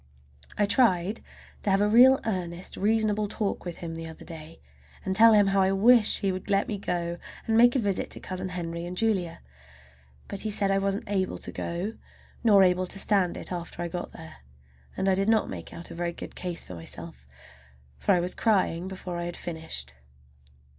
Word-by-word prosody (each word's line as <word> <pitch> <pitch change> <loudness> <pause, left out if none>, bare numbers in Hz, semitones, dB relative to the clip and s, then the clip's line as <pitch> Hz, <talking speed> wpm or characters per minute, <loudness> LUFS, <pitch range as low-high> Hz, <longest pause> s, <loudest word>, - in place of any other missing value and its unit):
I 205 - +3
tried 200 -3 +2 0.4
to - - -1
have 195 0 +3
a 205 - +3
real 255 +5 +7
earnest 180 -4 -3
reasonable 215 0 +1
talk 200 -2 -3
with 175 -2 -5
him 165 - -5
the 165 0 -6
other 160 - -10
day, 160 -1 -10 0.5
and 190 -1 -1
tell 225 +2 +8
him 205 -1 +6
how 195 0 +2
I 190 0 +3
wish 220 +2 +5
he 195 -2 +1
would 185 +2 -6
let 200 0 +2
me 205 -3 -3
go 175 -2 -3 0.3
and 225 - +1
make 240 +2 +6
a - - +4
visit 205 -6 -1
to - - -1
Cousin 185 0 -5
Henry 170 -2 -5
and 180 +1 -7
Julia. 190 -7 0 0.9
But 200 - -5
he 215 - -2
said 200 -1 +3
I 195 - +2
wasn't 195 +1 -1
able 195 -3 -1
to - - -7
go, 175 +6 -4 0.5
nor 205 -4 +6
able 180 0 +2
to 195 - -2
stand 195 -3 +1
it - - -7
after 175 -1 -6
I 170 - -3
got 175 +1 -5
there; 80 -3 -11 0.6
and 190 - 0
I 190 - +4
did 195 +3 +1
not 220 -1 +2
make 85 -3 -7
out 170 - -8
a - - -8
very 170 0 -2
good - - -8
case 175 -2 -5
for - - -9
myself, 80 -5 -9 0.7
for - - +3
I - - +2
was 180 +1 -1
crying 185 -5 +1
before 185 -2 -6
I 170 - -3
had 175 - -5
finished. 160 - -6
190 Hz, 205 wpm, -27 LUFS, 170-205 Hz, 0.9 s, tell